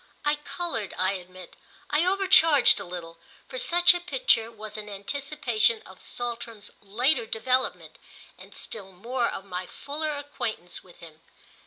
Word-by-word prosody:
I 295 0 +2
coloured, 295 - -4
I 185 +1 +2
admit, 185 -1 -9 0.4
I 305 +4 +3
overcharged 365 -8 +6
a - - -6
little, 170 -2 -8 0.3
for - - -4
such 350 -3 +6
a 350 - -2
picture 350 - +2
was 215 -1 -9
an 210 -1 -6
anticipation 230 +1 0
of 190 - -14
Saltram's 235 -3 -6
later 230 +5 +1
development 255 +4 -1 0.4
and - - -15
still 195 -3 -6
more 235 +6 -1
of 190 - -6
my 180 -1 -5
fuller 300 +2 -3
acquaintance 235 -10 -5
with 180 -2 -18
him. 160 -1 -13
230 Hz, 145 wpm, -26 LUFS, 195-295 Hz, 0.4 s, overcharged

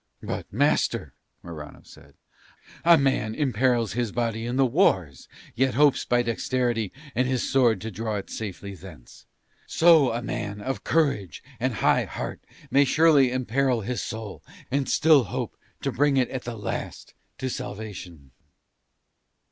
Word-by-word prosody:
"But, - - -5
master," 115 - +1 0.3
Morano 75 -3 -9
said, - - -17 0.7
"a 170 0 +7
man 130 -6 0
imperils 120 - +1
his 120 -2 -1
body 115 -1 -2
in 120 - -2
the 135 0 +4
wars 95 - +1 0.3
yet 130 +2 +1
hopes 145 0 +3
by 120 0 +2
dexterity 120 -2 -1 0.2
and 125 +1 +1
his 130 -2 -1
sword 120 -6 +3
to 110 - -5
draw 110 +2 -3
it 100 - -6
safely 100 -2 -6
thence: 85 -8 -14 0.4
so 160 -5 +5
a 120 +1 -3
man 105 -4 -4
of 135 +6 -4
courage 140 - 0 0.2
and - - -1
high - - +4
heart - - -6 0.3
may 140 - +5
surely 145 -2 +4
imperil 130 0 0
his 120 +4 -3
soul 110 -2 -6 0.3
and 140 0 0
still 150 -5 +5
hope 90 - -4 0.3
to - - 0
bring 145 0 +2
it 125 -2 +1
at 130 -2 -5
the 120 -1 -5
last 105 - -5 0.2
to 130 - -3
salvation." 100 - -7
120 Hz, 150 wpm, -25 LUFS, 105-135 Hz, 0.7 s, a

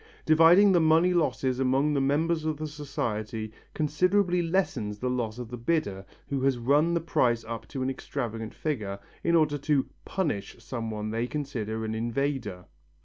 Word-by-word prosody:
Dividing 165 +6 +7
the 180 - +5
money 165 +3 +4
losses 130 -6 0
among 135 +3 +2
the 140 - +1
members 155 +4 +1
of 155 -1 -1
the 155 - -4
society, 115 -7 -4 0.2
considerably 180 +4 +2
lessens 165 - -1
the 125 +4 -2
loss 120 -3 -2
of 120 -2 -6
the 125 - -6
bidder 105 -9 -1 0.2
who 140 -2 -2
has 135 -1 +2
run 145 +8 +3
the - - +2
price 120 -8 +1
up 115 0 -6
to 130 - -4
an 130 - 0
extravagant 115 -5 -5
figure, 110 -11 -3 0.3
in 170 - +3
order 150 -3 +3
to 145 -1 +1 0.2
"punish" 150 - -2
some 115 -1 -5
one 110 0 -4
they 115 +2 -1
consider 115 -7 -3
an 110 - -3
invader. 115 -4 -2
135 Hz, 170 wpm, -28 LUFS, 115-155 Hz, 0.3 s, Dividing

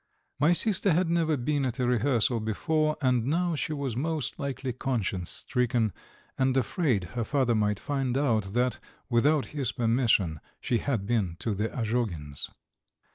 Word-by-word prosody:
My 150 +4 +4
sister 195 -1 +3
had 170 +1 +1
never 160 -3 +2
been 140 +3 0
at 125 -1 -2
a 125 - 0
rehearsal 120 -1 +2
before, 155 +8 0
and 125 -3 +3
now 170 +3 +1
she 155 - -2
was 140 -6 -3
most 155 0 -2
likely 135 -2 -3
conscience 110 -9 -2
stricken, 120 -4 0 0.5
and 130 0 +2
afraid 130 - +1
her 120 -1 -1
father 130 -1 +1
might 105 -2 +1
find 135 -4 -1
out 110 -8 +1
that, 125 +1 +1 0.3
without 140 +5 +3
his 140 -6 -1
permission, 115 - +2 0.2
she 120 - 0
had 120 -9 -1
been 100 -7 0
to 110 - -1
the 105 +3 -1
Azhogins'! 105 - -2
125 Hz, 155 wpm, -28 LUFS, 110-145 Hz, 0.5 s, My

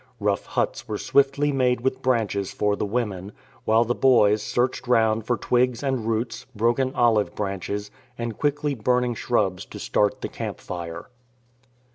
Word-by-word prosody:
Rough 100 -2 0
huts 120 - -2
were 105 -2 -3
swiftly 140 +3 +2
made 125 -3 +1
with 130 +1 -1
branches 110 -6 0
for 105 -1 0
the 105 - -2
women; 100 -4 -3 0.3
while 110 +1 +4
the 120 - 0
boys 110 -6 +4
searched 125 +3 -1
round 110 -2 +2
for 120 - +1
twigs 125 +1 +1
and 130 -5 -1
roots, 115 +1 -2
broken 120 +4 +1
olive 115 -4 +2
branches, 100 +1 -3 0.3
and 115 -2 -4
quickly 145 0 0
burning 125 +1 +1
shrubs 95 -6 0
to - - -10
start 105 -1 0
the - - -2
camp - - -6
fire. 85 -2 -7
115 Hz, 155 wpm, -24 LUFS, 105-125 Hz, 0.3 s, while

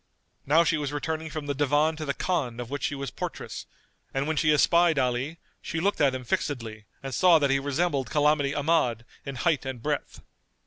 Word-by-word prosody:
Now 160 +4 +5
she 165 -2 +1
was 145 -1 -3
returning 160 +2 -3
from 155 -1 -5
the 145 - -1
Divan 145 +3 +2
to 155 - -4
the 140 -1 -2
Khan 135 -10 -1
of 120 +1 -6
which 145 - -3
she 145 - -2
was 140 0 -5
portress; - - -6 0.5
and 135 +1 0
when 160 - 0
she 155 0 +3
espied 170 +2 +4
Ali, 130 +5 0 0.2
she 165 - -3
looked 200 +5 0
at 135 -3 +3
him 130 - -5
fixedly 115 -4 -3 0.2
and 135 -1 -5
saw 180 +1 +6
that 140 -3 +2
he 135 - +3
resembled 140 -2 -1
Calamity 150 -1 +2
Ahmad 145 -7 +1 0.2
in 140 - -4
height 150 +3 +1
and 130 -2 -5
breadth. 145 +4 -3
145 Hz, 205 wpm, -27 LUFS, 135-160 Hz, 0.5 s, saw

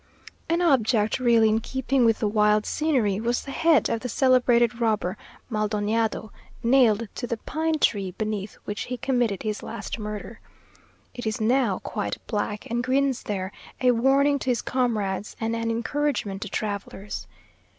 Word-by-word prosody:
An 340 +2 +2
object 230 -7 +2
really 235 -3 +4
in 215 +1 +2
keeping 265 +1 0
with 225 -1 +4
the 215 - +2
wild 210 0 +3
scenery, 250 -11 +1
was 240 +2 -1
the 275 - -7
head 325 +2 +3
of 230 - -1
the 250 - -5
celebrated 245 -2 +3
robber 210 -5 +1 0.4
MalDoñado, 215 0 -1 0.3
nailed 230 -3 +4
to 245 - -5
the 235 - -2
pine 315 +7 -1
tree 200 -9 +1
beneath 210 +1 -4
which 205 - -4
he 250 - -4
committed 245 -6 0
his 215 -1 -2
last - - -6
murder. 210 +1 -6 0.7
It 245 -3 -5
is 215 - -2
now 230 -3 +2
quite 100 0 -3
black, 210 -1 -3
and 240 +1 -1
grins 265 0 +1
there, 190 -2 -3 0.3
a 250 -1 +4
warning 275 +4 +3
to 260 - -3
his 240 -2 +1
comrades 215 -6 -1
and 225 0 -1
an 230 0 -2
encouragement 235 -3 -1
to 210 - -4
travellers. 200 -1 -4
230 Hz, 160 wpm, -25 LUFS, 210-255 Hz, 0.7 s, really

